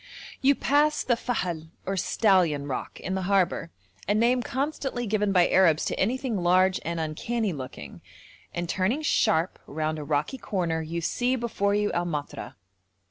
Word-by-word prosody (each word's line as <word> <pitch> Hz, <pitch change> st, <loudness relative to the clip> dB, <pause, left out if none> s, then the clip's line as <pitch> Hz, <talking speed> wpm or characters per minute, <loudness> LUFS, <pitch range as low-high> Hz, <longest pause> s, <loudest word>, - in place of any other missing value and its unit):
You 280 Hz, +1 st, +5 dB
pass 295 Hz, +3 st, +2 dB
the 240 Hz, -, +2 dB
Fahl, 175 Hz, -10 st, -3 dB, 0.2 s
or 195 Hz, -, -1 dB
Stallion 180 Hz, -7 st, +2 dB
Rock, 135 Hz, -, -5 dB
in 190 Hz, -, -4 dB
the 190 Hz, -, -1 dB
harbour, 185 Hz, -4 st, +2 dB, 0.4 s
a 205 Hz, -, +2 dB
name 240 Hz, +3 st, +3 dB
constantly 265 Hz, -1 st, -2 dB
given 210 Hz, -1 st, +1 dB
by 180 Hz, -2 st, +5 dB
Arabs 170 Hz, -4 st, +4 dB
to -, -, -2 dB
anything 245 Hz, +2 st, 0 dB
large 185 Hz, +2 st, +3 dB
and 170 Hz, 0 st, -3 dB
uncanny 195 Hz, +7 st, -2 dB
looking, 130 Hz, -, -8 dB, 0.5 s
and 175 Hz, 0 st, -3 dB
turning 195 Hz, -, 0 dB
sharp 165 Hz, -, +2 dB
round 155 Hz, +1 st, -2 dB
a -, -, -5 dB
rocky 150 Hz, -, -1 dB
corner 175 Hz, -6 st, -1 dB
you 165 Hz, +2 st, -4 dB
see 245 Hz, +9 st, 0 dB
before 210 Hz, -4 st, 0 dB
you 210 Hz, 0 st, +1 dB
El 175 Hz, 0 st, 0 dB
Matra. 150 Hz, -4 st, -5 dB
190 Hz, 160 wpm, -26 LUFS, 165-235 Hz, 0.5 s, You